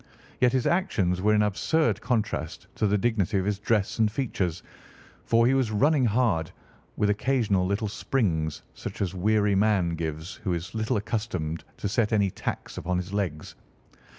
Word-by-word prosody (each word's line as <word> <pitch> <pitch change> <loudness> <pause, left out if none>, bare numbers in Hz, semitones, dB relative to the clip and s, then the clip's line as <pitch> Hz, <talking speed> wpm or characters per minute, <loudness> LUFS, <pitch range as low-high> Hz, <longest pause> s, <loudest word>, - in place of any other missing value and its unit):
Yet 125 -1 +4
his 130 -2 +1
actions 100 - +1
were 105 +2 +3
in 105 - +4
absurd 105 - +1
contrast 115 -3 -2
to 105 - 0
the 105 +1 +2
dignity 105 -2 +1
of 95 - 0
his 100 -1 -1
dress 105 0 0
and 110 -1 +3
features, 95 - -2 0.6
for 115 0 +4
he 130 - +4
was 130 -4 +2
running 135 +6 +3
hard, 105 -8 +1 0.5
with 105 -1 +2
occasional 105 -5 +1
little 100 +3 -1
springs, 85 - -1
such - - -7
as 95 -2 -2
a - - -7
weary 105 +2 +2
man 100 -3 +3
gives 80 +1 -4
who 95 - 0
is 85 +2 -6
little 110 +2 0
accustomed 95 -7 -3
to - - -2
set 105 +2 +1
any 100 -3 +2
tax - - -5
upon 90 +1 -1
his 90 +2 -4
legs. 90 -7 -3
105 Hz, 175 wpm, -26 LUFS, 90-115 Hz, 0.6 s, Yet